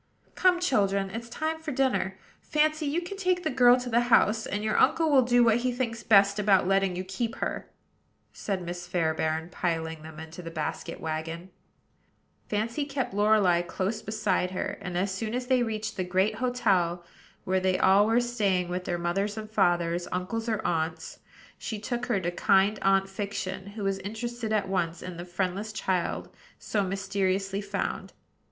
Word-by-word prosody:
"Come, 365 -1 +3
children; 200 - +1
it's 235 +2 -6
time 315 +6 -2
for 320 -1 -5
dinner. 255 -8 0 0.2
Fancy, 310 0 +1
you 325 +5 0
can 395 +3 -7
take 365 -2 0
the 315 - 0
girl 250 -1 +6
to 250 - -6
the 235 -1 +3
house; 220 -1 +4
and 205 +1 -3
your 215 0 0
uncle 325 -2 +3
will 270 -2 +6
do 245 0 +4
what 225 -1 +4
he 250 +1 0
thinks 235 -2 -3
best 200 -1 +5
about 195 -3 +3
letting 195 -1 +2
you 185 - -3
keep 205 +5 -3
her," - - -4 0.6
said 195 -3 -3
Miss 175 0 -6
Fairbairn, 160 -1 -1
piling 160 -3 -2
them 160 0 -10
into 160 +2 -9
the 165 - -7
basket 155 -2 -4
wagon. 165 +3 -5 1.0
Fancy 225 +7 -1
kept 275 -6 -3
Lorelei 205 -4 +4
close 190 +4 -3
beside 210 -4 0
her; 185 - -3
and 180 -1 -4
as 190 +2 0
soon 220 +4 -3
as 250 0 -2
they 255 -1 +3
reached 220 -2 -3
the 185 - 0
great 190 +4 +1
hotel, 195 -9 +1 0.4
where 190 0 +1
they 185 0 +1
all 200 +2 +5
were 225 +2 +4
staying 205 -7 0
with 180 0 -4
mothers 180 +4 -1
and 215 0 -6
fathers, 175 -3 +1
uncles 225 +6 -2
or 220 -2 -2
aunts, 160 -1 -2 0.4
she 220 - -4
took 240 +3 -3
her 235 -6 +1
to 175 -1 -2
kind 195 +3 +3
Aunt 195 0 +3
Fiction, 195 -1 -4
who 205 +1 -7
was 195 0 0
interested 225 +3 -5
at 210 -3 +1
once 175 -3 -1
in 180 -2 -7
the 175 - -6
friendless 185 +4 -2
child 190 -4 -1 0.3
so 210 - -1
mysteriously 195 0 -1
found. 200 0 -4
200 Hz, 175 wpm, -28 LUFS, 180-230 Hz, 1.0 s, girl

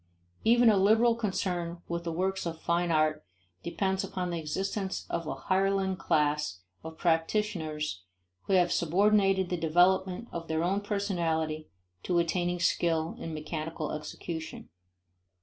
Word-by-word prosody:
Even 235 0 +6
a 205 - +3
liberal 220 +5 +5
concern 180 -6 -2
with 170 0 -3
the 165 - -1
works 190 +2 -1
of 165 -1 -5
fine 170 +1 0
art 155 -1 +2 0.4
depends 190 +2 -1
upon 180 -2 -3
the 170 - -2
existence 190 +5 -3
of 165 - -2
a - - -2
hireling 190 +5 +1
class 150 - 0 0.2
of 160 0 -8
practitioners 165 - 0 0.4
who - - 0
have 180 -2 +4
subordinated 195 +2 +3
the 180 - -1
development 180 +5 +2
of 165 -1 -6
their 160 +1 0
own 195 +3 +1
personality 165 -7 -1 0.3
to 175 - 0
attaining 175 +1 0
skill 165 -1 +1
in 165 - -5
mechanical 155 0 -4
execution. 160 +1 -6
175 Hz, 135 wpm, -29 LUFS, 160-190 Hz, 0.4 s, Even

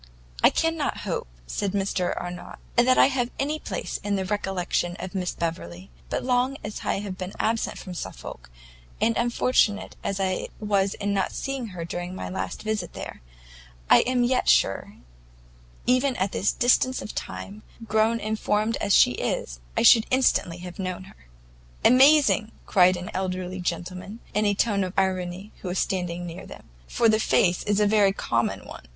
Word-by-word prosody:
"I - - +7
cannot 325 -3 -1
hope," - - -3 0.2
said 195 - -2
Mr 195 -2 -1
Arnott, 175 0 -7 0.2
"that 250 +2 +4
I - - +8
have 260 -3 0
any 300 +3 -1
place - - -4
in 205 0 0
the 190 -1 -1
recollection 185 -3 -1
of 185 - -7
Miss 185 -2 -2
Beverley, 95 - -5 0.2
but - - -2
long 255 +2 +1
as 210 0 -6
I - - 0
have 195 -3 -6
been 185 +1 -5
absent 225 +1 0
from 185 - -8
Suffolk, - - -8 0.5
and 230 - +2
unfortunate 235 -3 +1
as 200 0 -2
I 185 -1 -1
was 200 -2 +1
in 205 0 -2
not 195 -1 0
seeing 270 -3 -3
her 180 -5 -6
during 175 +2 -5
my - - -5
last 185 - -4
visit 215 -5 -2
there, - - -8 0.7
I - - +9
am 250 -1 +1
yet 250 +1 +2
sure, - - +2 0.9
even 255 +1 +2
at 190 -1 -1
this 200 - +1
distance 255 +1 +2
of - - -7
time, 205 +2 -6 0.2
grown 220 +1 +2
and 215 0 -3
formed 215 +2 0
as 200 -2 +2
she - - +6
is, - - -3 0.2
I - - +3
should 225 - +7
instantly 255 -9 +2
have 180 +1 -9
known 185 -1 -3
her." 190 - -18 0.6
"Amazing!" 265 -3 +6
cried 185 -2 +4
an 180 +1 -6
elderly 185 0 -3
gentleman, 180 +4 -4
in 210 0 +1
a 205 - +2
tone 200 -2 +1
of 185 -1 -4
irony, 185 +1 -1
who - - -6
was 180 +1 -2
standing 175 -2 -1
near 170 0 -8
them, - - -11 0.2
"for 235 - +2
the 215 -1 +4
face 180 -4 +2
is 205 0 +1
a 210 - +4
very 205 -2 +4
common 115 -10 -1
one!" - - -11
200 Hz, 175 wpm, -25 LUFS, 180-230 Hz, 0.9 s, I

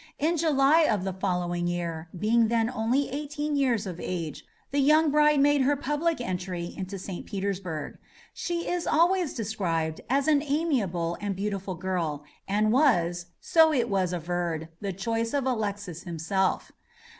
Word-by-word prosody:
In 320 +4 +1
July 310 0 +4
of 210 -5 +1
the 190 -1 -2
following 180 -2 -1
year, 170 -2 -3
being 225 +4 +3
then 230 +1 +1
only 255 +4 +1
eighteen 295 +1 -3
years 250 -6 +1
of 180 -2 -6
age, 165 -5 -4 0.3
the 285 - +1
young 305 +2 +4
bride 300 0 +4
made 290 0 +4
her 280 +2 +3
public 295 +3 -1
entry 180 -5 -4
into 190 +1 -5
St. 185 -1 -6
Petersburg. 190 -6 -4 0.3
She 340 0 -3
is 350 -1 -1
always 345 0 +2
described 175 -8 -2
as 275 +2 +2
an 295 -2 +4
amiable 250 - -1
and 205 -1 -2
beautiful 195 -1 -3
girl, 170 -5 -2 0.2
and 210 +2 +2
was, 175 - +2
so 320 -1 +5
it 240 -7 0
is 185 -3 +1
averred, 170 -2 -2
the 200 -2 -3
choice 225 +6 -2
of 275 -2 0
Alexis 205 -8 -2
himself. 180 +3 -1
210 Hz, 155 wpm, -27 LUFS, 180-285 Hz, 0.3 s, so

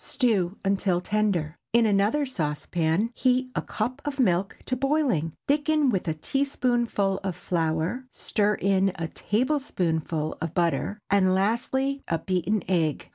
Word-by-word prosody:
Stew 205 -8 +1
until 195 -2 +1
tender. 180 -6 -1
In 235 0 +5
another 210 +8 +2
saucepan 165 - -1
heat 255 +1 +1
a - - +1
cup 250 +6 -3
of 285 -1 -4
milk 190 -5 +1
to 255 - -1
boiling, 255 - +1
thicken 295 -1 +2
with 190 -5 -1
a 160 - 0
teaspoonful 240 - 0
of 190 -3 -2
flour, 165 +8 -1
stir 210 -1 0
in 195 -1 +2
a 165 - -3
tablespoonful 170 - -1
of 165 0 -4
butter, 170 +3 0
and 185 -2 +4
lastly, 265 +7 0
a 165 - +1
beaten 185 +4 -1
egg. 165 -5 0
200 Hz, 135 wpm, -26 LUFS, 170-255 Hz, -, In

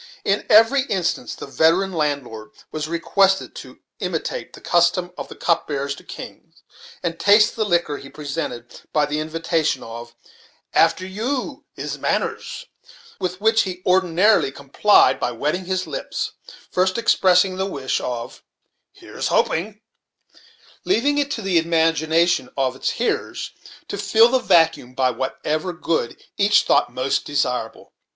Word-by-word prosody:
In 200 +1 0
every 225 +6 +6
instance 185 -7 -2
the - - -8
veteran 170 +7 +2
landlord 140 -9 -3 0.2
was 155 -1 -4
requested 190 +4 +1
to - - -11 0.2
imitate - - -4
the - - -12
custom 175 +1 +2
of - - -7
the - - -11
cupbearers 140 -4 -1
to - - -13
kings, - - -11 0.4
and 165 -1 -3
taste 210 +2 +5
the 220 -2 0
liquor 170 -6 0
he 135 - -11
presented, 135 -6 -6
by 150 -1 +3
the 150 +1 -2
invitation 160 0 -1
of 115 +1 -9 0.6
"After 165 +3 +3
you 255 +8 -4
is - - -5
manners," - - -2 0.5
with 185 -1 -3
which 220 0 +3
request 180 -1 -5
he 180 - -28
ordinarily 185 -1 +3
complied 140 +10 +3
by 125 - -1
wetting 150 +10 -2
his 185 0 -1
lips, - - -4 0.4
first 185 +2 +1
expressing 185 -4 +3
the 190 +1 -1
wish 140 -8 -2
of 120 -1 -5 0.5
"Here's - - -5
hoping," 205 +6 0 1.0
leaving 290 -4 +1
it 285 -1 0
to 230 -7 -4
the 185 -3 +3
imagination 165 -2 +2
of 130 -2 +1
the 130 - -15
hearers 240 - -2 0.4
to - - -5
fill 225 +1 +5
the 260 +1 +2
vacuum 165 - +2
by 130 -1 +2
whatever 150 +7 -3
good 165 -7 -2 0.2
each 205 +1 +4
thought - - +2
most 130 +2 -1
desirable. 125 -5 -3
170 Hz, 145 wpm, -21 LUFS, 145-195 Hz, 1.0 s, every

